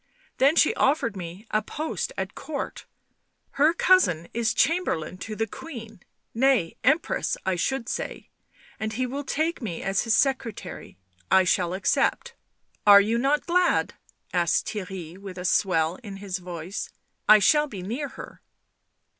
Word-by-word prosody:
" -, -, -35 dB
Then 280 Hz, +4 st, +5 dB
she 315 Hz, -, +4 dB
offered 265 Hz, -6 st, +1 dB
me 180 Hz, +3 st, -8 dB
a 215 Hz, -, +2 dB
post 310 Hz, +8 st, -4 dB
at -, -, -3 dB
Court. 305 Hz, -2 st, -6 dB, 0.6 s
Her 290 Hz, +3 st, +4 dB
cousin 335 Hz, -, +3 dB
is 230 Hz, -1 st, +1 dB
Cham 335 Hz, +5 st, +3 dB
berlain 165 Hz, -, -3 dB
to 215 Hz, +3 st, -6 dB
the 225 Hz, -, 0 dB
Queen 225 Hz, -, -10 dB, 0.2 s
— -, -, -51 dB
nay, 230 Hz, -12 st, +2 dB
Empress, 320 Hz, -, +1 dB
I 190 Hz, -1 st, +1 dB
should 235 Hz, +7 st, -1 dB
say -, -, -5 dB, 0.2 s
— -, -, -27 dB
and 220 Hz, 0 st, -3 dB
he 255 Hz, +3 st, -1 dB
will 275 Hz, +3 st, -4 dB
take 315 Hz, +4 st, -1 dB
me 185 Hz, -8 st, -5 dB
as 195 Hz, 0 st, +1 dB
his 230 Hz, -2 st, +2 dB
secretary. 235 Hz, -, -2 dB, 0.3 s
I 190 Hz, -, +6 dB
shall 180 Hz, 0 st, +1 dB
accept." 335 Hz, -, 0 dB, 0.5 s
Are 200 Hz, -1 st, +10 dB
you 220 Hz, +3 st, +1 dB
not 280 Hz, +4 st, +1 dB
glad 360 Hz, +1 st, +2 dB, 0.2 s
?" -, -, -37 dB
asked 170 Hz, -2 st, +2 dB
Theirry, 185 Hz, -4 st, -6 dB
with 195 Hz, -2 st, -9 dB
a 180 Hz, -, -5 dB
swell 175 Hz, -2 st, +2 dB
in 205 Hz, -5 st, -9 dB
his 195 Hz, -2 st, -4 dB
voice. 175 Hz, +1 st, -6 dB, 0.2 s
" -, -, -19 dB
I 215 Hz, -, +10 dB
shall 295 Hz, +9 st, +4 dB
be 200 Hz, -9 st, -8 dB
near 245 Hz, +10 st, -3 dB
her. -, -, -11 dB
215 Hz, 170 wpm, -25 LUFS, 185-275 Hz, 0.6 s, Are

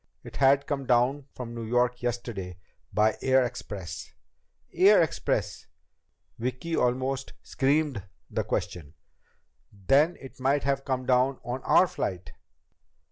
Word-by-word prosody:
It -, -, -10 dB
had 140 Hz, +1 st, +4 dB
come 140 Hz, -3 st, -3 dB
down 130 Hz, +3 st, +2 dB
from 120 Hz, -2 st, -7 dB
New 115 Hz, -, -6 dB
York 120 Hz, +2 st, +1 dB
yesterday 120 Hz, -7 st, -4 dB, 0.3 s
by 110 Hz, +1 st, +2 dB
air 130 Hz, 0 st, +4 dB
express 95 Hz, -10 st, -7 dB, 0.3 s
..." -, -, -45 dB
"Air 200 Hz, +3 st, +6 dB
express?" 160 Hz, -4 st, -1 dB, 0.7 s
Vicki 130 Hz, +8 st, -3 dB
almost 130 Hz, +2 st, -1 dB
screamed 140 Hz, -3 st, 0 dB, 0.3 s
the -, -, -2 dB
question. 80 Hz, -3 st, -4 dB, 0.8 s
"Then 135 Hz, -, +2 dB
it 135 Hz, -1 st, -12 dB
might 135 Hz, +2 st, +1 dB
have 135 Hz, 0 st, -1 dB
come 130 Hz, -1 st, -2 dB
down 130 Hz, +1 st, +2 dB
on 125 Hz, +2 st, -4 dB
our -, -, +5 dB
flight!" 90 Hz, -5 st, -4 dB
125 Hz, 130 wpm, -27 LUFS, 115-135 Hz, 0.8 s, Air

